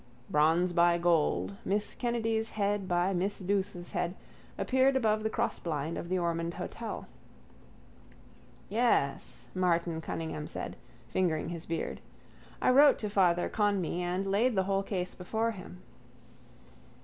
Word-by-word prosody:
Bronze 165 +4 +3
by 170 0 +4
gold, 150 - +1
Miss 205 +2 -1
Kennedy's 225 -2 -1
head 205 -2 -1
by 180 +1 +1
Miss 190 +3 -1
Douce's 190 -2 -2
head, 175 +1 -1 0.4
appeared 265 +1 +3
above 215 -4 +2
the 220 - 0
crossblind 165 -9 -2
of 170 - -5
the 185 - +1
Ormond 170 -1 -1
hotel. - - -5 1.6
—Yes, 210 - 0
Martin 170 -3 +1
Cunningham 160 -2 -4
said, - - -5 0.3
fingering 165 +3 0
his 170 -1 -6
beard. 165 0 -3 0.6
I - - +5
wrote 280 +2 +7
to 210 -2 -4
Father 175 -3 +3
Conmee 200 -5 0
and 180 +2 -1
laid 215 +5 +2
the 190 - +3
whole 195 0 +1
case 185 -2 -3
before 220 +5 -1
him. 185 -3 -10
185 Hz, 130 wpm, -31 LUFS, 170-210 Hz, 1.6 s, wrote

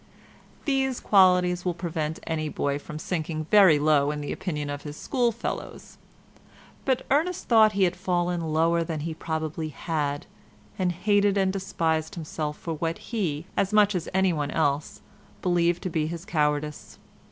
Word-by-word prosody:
These 270 -3 +1
qualities 180 -2 +4
will 180 -2 -1
prevent 160 -2 -3
any 155 -1 -2
boy 140 -1 -1
from 150 +1 -8
sinking 155 -1 -3
very 195 -7 +7
low 145 -1 +3
in 150 0 -3
the 145 - -4
opinion 150 -6 -3
of 145 0 -5
his 150 0 -8
schoolfellows; 240 -3 -3 0.9
but 260 -2 +1
Ernest 325 +6 +1
thought 220 -2 +6
he 200 -1 +2
had 180 -1 +2
fallen 175 -1 -1
lower 165 +2 +2
than 160 -2 -4
he 165 +1 -3
probably 160 0 -3
had, 145 -2 -2 0.5
and 180 -1 +2
hated 205 +3 +2
and 190 -1 +2
despised 165 -3 -1
himself 155 -2 -4
for 165 - -4
what 165 +1 -2
he, 170 -9 -3
as 195 - +1
much 210 -1 +4
as 180 -3 -3
anyone 180 -6 +1
else, 145 -1 -1 0.4
believed 175 -1 +2
to 185 - -2
be 155 -1 0
his 170 +2 -6
cowardice. 150 -5 -1
170 Hz, 155 wpm, -26 LUFS, 155-190 Hz, 0.9 s, very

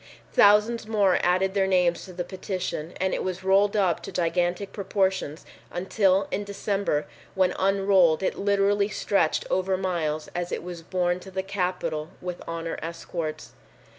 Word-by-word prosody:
Thousands 210 +3 +5
more 205 -4 +3
added 185 +2 +2
their 195 -1 +2
names 180 -2 +2
to 185 - -11
the 175 0 -3
petition 185 -3 -4
and 190 0 0
it - - -1
was 185 0 -4
rolled 195 +2 +3
up 190 -5 +2
to - - -7
gigantic 175 +2 -1
proportions 190 -6 -1 0.2
until 190 +1 +1
in 205 - -1
December 200 -6 -1 0.3
when 185 -1 +3
unrolled 195 -4 +3
it - - +1
literally 200 0 +2
stretched 195 -5 +1
over 185 0 +1
miles 165 -5 -2
as 175 0 -3
it - - -3
was 175 -1 -7
borne 175 +1 0
to 190 - -11
the 190 0 -3
Capitol 180 -5 -2
with 180 -1 -6
honor 165 0 -4
escorts. 165 -1 -5
185 Hz, 155 wpm, -26 LUFS, 175-195 Hz, 0.3 s, Thousands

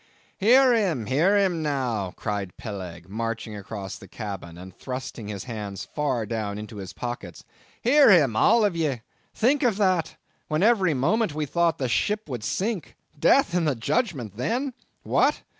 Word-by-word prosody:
"Hear 250 +5 +6
him, 185 - +1
hear 160 - +3
him 185 -5 +1
now," 125 -10 -1
cried 100 -4 -4
Peleg, 90 -6 -7
marching 115 +1 -4
across 100 -1 -7
the 95 - -12
cabin, 95 -5 -7
and 95 +1 -11
thrusting 125 -4 -6
his 100 -2 -5
hands 105 -5 -6
far 135 -7 0
down 105 -2 -3
into 105 0 -8
his 95 -3 -7
pockets,—"hear 235 - 0
him, 145 - +5
all 225 - +5
of 200 -4 0
ye. 145 -8 -1 0.3
Think 265 +6 +2
of 235 -7 +2
that! 185 -5 +1 0.3
When 155 +3 0
every 195 -8 +4
moment 170 - +1
we 155 -1 -1
thought 170 +3 +1
the 130 - -1
ship 210 - 0
would 125 -6 -5
sink! 185 - -2 0.2
Death 270 - +4
and 175 -3 +1
the 145 - +1
Judgment 120 - -1
then? 250 - -1 0.3
What? - - +2
135 Hz, 160 wpm, -25 LUFS, -, 0.3 s, Hear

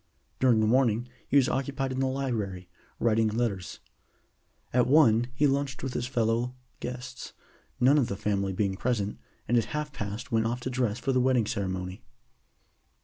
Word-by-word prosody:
During 120 -4 +4
the - - +3
morning 120 0 +2 0.2
he 140 - +3
was 135 - +5
occupied 135 0 -1
in 130 - -3
the 135 - +2
library, 110 -9 -2 0.3
writing 115 -1 +3
letters. 110 -4 -2 0.9
At 125 0 +3
one 120 -5 +5
he 145 - +3
lunched 140 -1 0
with 135 -2 -3
his 120 - -2
fellow 120 0 0 0.2
guests, 125 0 -6 0.5
none 135 +4 +5
of 125 - +1
the 100 - -4
family 100 -1 0
being 95 0 0
present, 105 -2 -1 0.3
and 120 0 +4
at 115 - -1
half 150 +6 -4
past 105 -3 -5
went 115 -1 +2
off 120 +2 -2
to 130 - -3
dress 120 -4 0
for 135 - -1
the 130 - +3
wedding 125 -3 +3
ceremony. 95 -2 -3
120 Hz, 170 wpm, -28 LUFS, 105-130 Hz, 0.9 s, was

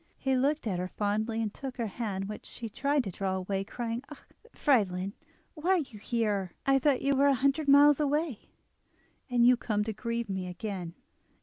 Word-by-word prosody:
He 265 -1 0
looked 280 +3 +1
at 190 -5 -1
her 180 - -2
fondly, 215 +3 -1
and 210 -2 -3
took 265 -2 -7
her 235 - -1
hand, 200 -2 -3
which 210 - -8
she 235 - -7
tried 280 +5 +1
to 195 - -4
draw 190 +1 -2
away, 190 +1 -2
crying: 235 +3 -4
"Ah! 300 - -11 0.3
Friedlin, 195 -8 +1 0.4
why 330 +2 -3
are - - +4
you 260 -10 -5
here? 210 -5 -1
I 270 -1 +4
thought 270 -1 +2
you 275 0 +2
were 280 +1 +4
a 280 - +4
hundred 275 +4 +1
miles 285 +1 +7
away. 295 -3 -1 0.8
Are 245 - -1
you 240 +1 +7
come 210 -3 -1
to 220 +1 -3
grieve 230 +2 -3
me 190 -2 -3
again?" 180 -2 -5
230 Hz, 195 wpm, -30 LUFS, 200-275 Hz, 0.8 s, miles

